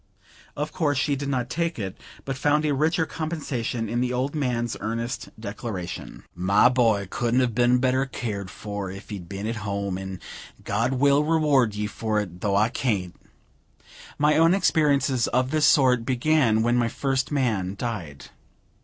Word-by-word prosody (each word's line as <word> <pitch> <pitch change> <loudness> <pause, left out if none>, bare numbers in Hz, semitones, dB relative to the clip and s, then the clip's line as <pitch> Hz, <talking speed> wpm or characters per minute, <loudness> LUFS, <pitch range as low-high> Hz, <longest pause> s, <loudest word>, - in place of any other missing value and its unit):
Of 150 +1 -2
course, 145 -5 0
she 140 +2 +1
did 140 +1 -4
not 125 -3 -1
take 165 +6 -2
it, 95 -4 -4 0.3
but 135 - -3
found 150 +3 +2
a 150 - +2
richer 160 +4 +1
compensation 140 -9 -3
in 120 +3 -1
the 125 0 0
old 130 +3 -1
man's 120 -6 -1
earnest 115 +3 -3
declaration: 100 -4 -6
"My 95 +6 +4
boy 115 -6 +2
couldn't 120 +5 +1
have 125 -3 0
been 120 +2 +4
better 130 +2 +1
cared 105 -7 -4
for 100 -1 -5
if 95 +3 -10
he'd 95 -5 -7
been 100 +1 -5
at 115 +1 -2
home; 100 -2 -3
and 95 -1 -6 0.5
God 115 +6 0
will 140 +2 +4
reward 150 -8 +2
you 105 0 -2
for 110 0 -1
it, 90 -4 -6
though 100 -2 +1
I 105 +3 +3
can't." 105 -8 -1 1.0
My 150 +1 +3
own 165 +3 +5
experiences 140 - +2
of 125 +2 0
this 155 -1 +3
sort 125 -4 +4
began 125 -3 +2
when 120 +1 +2
my 120 -1 +2
first 130 +2 -1
man 110 -9 0
died. 100 - -5
120 Hz, 170 wpm, -25 LUFS, 105-140 Hz, 1.0 s, own